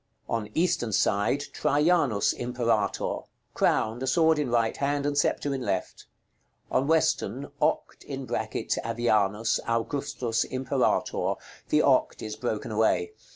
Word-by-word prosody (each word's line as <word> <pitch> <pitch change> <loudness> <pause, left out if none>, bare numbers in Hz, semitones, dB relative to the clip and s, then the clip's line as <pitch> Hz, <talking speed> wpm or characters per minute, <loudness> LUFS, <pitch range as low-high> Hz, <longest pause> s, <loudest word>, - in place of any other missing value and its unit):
On 110 -2 -2
eastern 160 -9 +1
side, 105 +9 +2
"TRAJANUS 150 - +2
IMPERATOR." 120 -4 -1 0.3
Crowned, 110 +3 +1
a 130 - -2
sword 160 +3 +3
in 145 -4 -1
right 115 -1 +1
hand, 145 0 0
and 145 0 0
sceptre 145 0 +1
in 135 - -3
left. - - -3 0.6
On 130 +2 +1
western, 140 -5 +1
"(OCT)AVIANUS 110 -1 0
AUGUSTUS 115 0 -1
IMPERATOR." 130 0 0 0.3
The - - +3
"OCT" - - +2
is 110 -1 -5
broken 110 -2 -3
away. 110 - +1
125 Hz, 110 wpm, -27 LUFS, 110-145 Hz, 0.6 s, sword